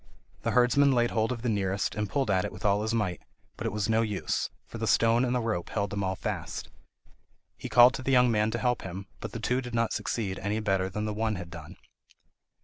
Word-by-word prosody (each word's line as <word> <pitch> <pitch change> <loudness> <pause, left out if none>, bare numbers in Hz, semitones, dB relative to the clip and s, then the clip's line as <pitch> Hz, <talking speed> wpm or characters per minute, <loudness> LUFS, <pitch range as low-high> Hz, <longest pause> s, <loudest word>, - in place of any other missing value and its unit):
The - - -1
herdsman 130 +3 +4
laid 120 -1 +2
hold 110 +2 +1
of 120 -2 -4
the - - -1
nearest, 100 -3 0
and 105 -2 -2
pulled 135 -1 0
at 95 -1 +2
it - - -3
with 90 +2 -9
all 100 0 +3
his 110 +1 -1
might, 105 -7 -1 0.3
but - - -3
it - - -2
was 105 0 -1
no 110 0 +3
use, 105 -4 -1 0.2
for - - -9
the - - -2
stone 115 +2 +4
and 125 0 0
the - - +2
rope 110 -6 -2
held 100 -3 -2
them 100 -1 -2
all 95 0 -1
fast. - - -4 0.9
He - - -7
called 125 +1 +7
to 130 - -5
the 135 - -1
young 125 -2 +5
man 105 -1 +2
to 115 - -2
help 125 +1 0
him, 95 +1 -6
but - - -6
the 115 - -5
two 125 +4 0
did 125 -2 -6
not 115 -1 +1
succeed 100 -5 -2
any 105 +2 -1
better 95 -3 0
than 105 +3 -3
the 105 - -2
one 110 0 -1
had 90 -2 -7
done. 80 -2 -9
110 Hz, 245 wpm, -28 LUFS, 100-120 Hz, 0.9 s, called